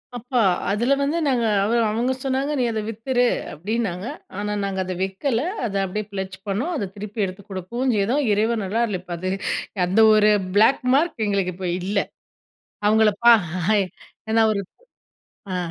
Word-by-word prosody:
அப்ப 245 +2 -10 0.4
அதுல 235 +6 +2
வந்து 290 +4 0
நாங்க 245 -4 +1 0.2
அவ 215 - 0 0.2
அவங்க 235 +4 0
சொன்னாங்க, 270 +2 0
"நீ 250 - +2
அத 220 -1 -2
வித்துரு" 245 +3 0 0.3
அப்படின்னாங்க. 200 +1 -3 0.3
ஆனா 210 0 -2
நாங்க 195 -1 -2
அத 185 0 -4
விக்கல. 210 +6 -1 0.2
அத 200 -4 -3
அப்படியே 210 +3 -4
ஃபிளட்ஜ் 190 -1 -5
பண்ணோம். 235 - -1
அத 205 -9 -2
திருப்பி 210 +1 -4
எடுத்து 190 +2 -8
குடுக்கவுஞ் 235 +8 -2
செய்தோம். 240 +9 +1
இறைவன் 220 +1 +1
அருளால் 220 -1 0
இப்ப 180 -1 -7
அது 185 +2 -3 0.6
அந்த 195 +5 +1 0.2
ஒரு 215 0 +5 0.3
பிளேக் 225 +6 +5
மார்க் 310 -6 +1
எங்களுக்கு 195 -3 0
இப்ப 185 0 -4
இல்ல. 200 +2 0 0.9
அவங்கள 215 0 +5 0.2
பா 235 - +10 1.0
ஏன்னா 225 0 +4
ஒரு 200 - -1 0.9
ஆ. - - 0
215 Hz, 155 wpm, -22 LUFS, 195-240 Hz, 1.0 s, பா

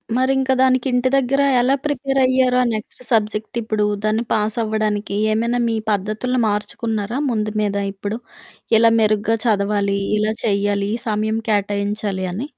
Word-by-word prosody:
మరింక 265 +1 +1
దానికి 260 0 +3
ఇంటి 250 +1 +2
దగ్గర 275 +1 +2 0.2
ఎలా 260 +3 +3
ప్రిపేర్ 275 -2 -1
అయ్యారు? 255 -1 +3
ఆ - - +3
నెక్స్ట్ 215 +3 -6
సబ్జెక్ట్ 215 +1 0
ఇప్పుడు 215 -1 0 0.2
దాన్ని 215 +2 +1
పాస్ 215 +1 0
అవ్వడానికి 215 -2 -1 0.2
ఏమైనా 235 +2 0
మీ 225 - 0 0.2
పద్ధతులు 215 +6 -1
మార్చుకున్నారా 210 +3 -2
ముందు 215 -2 -1
మీద? 200 -1 -1 0.2
ఇప్పుడు, 205 +3 -4 0.6
ఇలా 230 0 +5
మెరుగ్గా 215 +1 +2
చదవాలి, 200 -2 +1 0.2
ఇలా 215 +1 0
చెయ్యాలి, 200 -1 0
ఈ - - -8
సమయం 215 +1 0
కేటాయించాలి 200 -1 -1
అని. 260 +10 -5
215 Hz, 145 wpm, -20 LUFS, 205-245 Hz, 0.6 s, ఇలా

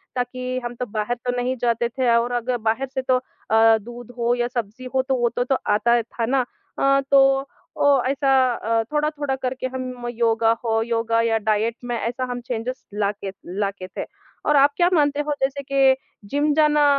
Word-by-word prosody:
ताकि 255 +1 -2
हम 240 - -4
तो 250 - -1
बाहर 215 +2 -2
तो 245 - +1
नहीं 250 +1 0
जाते 235 0 +1
थे 255 0 0
और 235 +1 +1
अगर 245 +1 -1
बाहर 225 +4 -1
से 265 - -1
तो 255 0 +2
अ, 225 -3 +2
दूध 240 +2 -10
हो 235 0 +1
या 240 0 0
सब्जी 240 0 -5
हो 260 - +4
तो 265 - +3
वो 240 -1 +2
तो 255 +2 +1
आता 235 +3 +3
था 230 +1 -4
ना। 255 +1 +1 0.3
अ, 275 0 +4
तो 270 0 +5 0.3
ओ - - +1 0.2
ऐसा 275 0 +1 0.2
अ, 225 0 0
थोड़ा-थोड़ा 295 -2 0
करके 260 0 -3
हम 255 -1 -5
योगा 225 -1 +2
हो 225 0 +2
योगा 230 0 +1
या 225 -1 +2
डाइट 215 +2 0
में 240 -1 -2
ऐसा 245 +3 -3
हम 245 - -4
चेंज़ेस 250 +1 -4
लाते 200 -1 -2 0.3
लाते 195 -2 -2
थे। - - -2 0.4
और 300 - +3
आप 280 +1 +6
क्या 350 0 +4
मानते 290 -3 +2
हो 295 - +1
जैसे 275 +1 -1
के 270 -1 +5 0.3
जिम 290 +1 +1
जाना 300 -1 +4
245 Hz, 190 wpm, -22 LUFS, 230-270 Hz, 0.4 s, आप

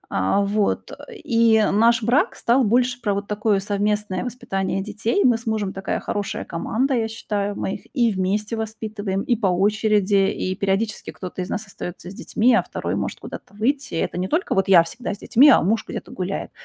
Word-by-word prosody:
А 95 - +2
вот, 200 +1 0
э, - - -11
и 230 -3 +4
наш 230 +2 +3
брак 245 +6 +2
стал 250 +3 +2
больше 245 +2 +1
про 205 -3 0
вот 200 +1 -3
такое 210 -1 +1
совместное 205 -1 -1
воспитание 195 -6 -3
детей. 220 - -1
Мы 235 -2 +4
с 230 - -14
мужем 215 -3 -1
такая 195 0 -3
хорошая 205 -1 -3
команда, 240 +11 -1
я 230 -3 +1
считаю. 205 -2 -3
Мы 195 - -2
их - - -12
и 240 -5 +2
вместе 205 +4 -1
воспитываем, 215 -3 -4
и 240 - +1
по 215 -3 0
очереди, 200 +1 +2
и 185 - -3
периодически 200 +3 -1
кто-то 185 0 -7
из 180 - -5
нас 220 - -3
остаётся 180 -2 -8
с - - -10
детьми, 235 +5 +1
а 235 - +5
2 - - -4
может - - -3
куда-то - - -10
выйти. 265 0 -1
И - - -1
это 175 - -2
не 185 - -1
только 320 - 0
вот 195 -1 +1
я 180 -4 +7
всегда 200 +6 -5
с - - -17
детьми, 270 +7 +5
а - - +6
муж 215 +5 +1
где-то - - -7
гуляет. 185 +1 -4
210 Hz, 200 wpm, -22 LUFS, 195-230 Hz, -, я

